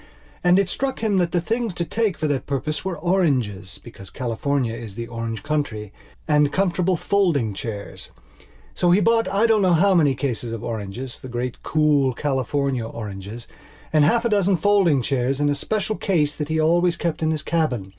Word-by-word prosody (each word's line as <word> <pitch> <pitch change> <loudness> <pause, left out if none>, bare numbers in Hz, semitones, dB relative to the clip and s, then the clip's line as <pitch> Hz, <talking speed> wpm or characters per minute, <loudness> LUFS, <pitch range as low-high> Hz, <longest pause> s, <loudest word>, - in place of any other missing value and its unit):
And 180 +1 +5
it 195 -1 +2
struck 265 +5 -3
him 210 -3 +2
that 175 -2 +1
the 175 - +1
things 225 +2 -2
to 170 - -2
take 215 -1 -1
for 155 - -1
that 145 -3 -2
purpose 145 +2 -2
were 185 -3 -3
orangesbecause 120 - -2
California 125 0 -1
is 115 -4 -8
the 115 +1 -4
orange 115 -1 -5
countryand 145 +1 -1
comfortable 185 0 +1
folding 160 - +1
chairs. 100 0 -7 0.6
So 175 - +1
he 180 +3 +5
bought 225 +2 +3
I 200 +3 +2
don't 220 -2 +3
know 185 -2 +4
how 195 +4 +4
many 150 -6 +3
cases 125 -3 -3
of 115 - -6
orangesthe 115 +4 -6
great 120 +1 -4
cool 150 -4 +2
California 135 -2 -1
oranges, 105 +1 -7 0.5
and 155 -1 +5
half 230 +10 +3
a - - +2
dozen 200 -3 +2
folding 175 -7 +3
chairs 135 +1 0
in 145 0 +2
a - - +2
special 215 +8 -2
case 150 -7 +1
that 150 0 -4
he 160 0 0
always 170 +2 +2
kept 170 -2 -2
in 160 - +1
his 155 -2 -2
cabin. 130 - -1
150 Hz, 180 wpm, -22 LUFS, 120-180 Hz, 0.6 s, And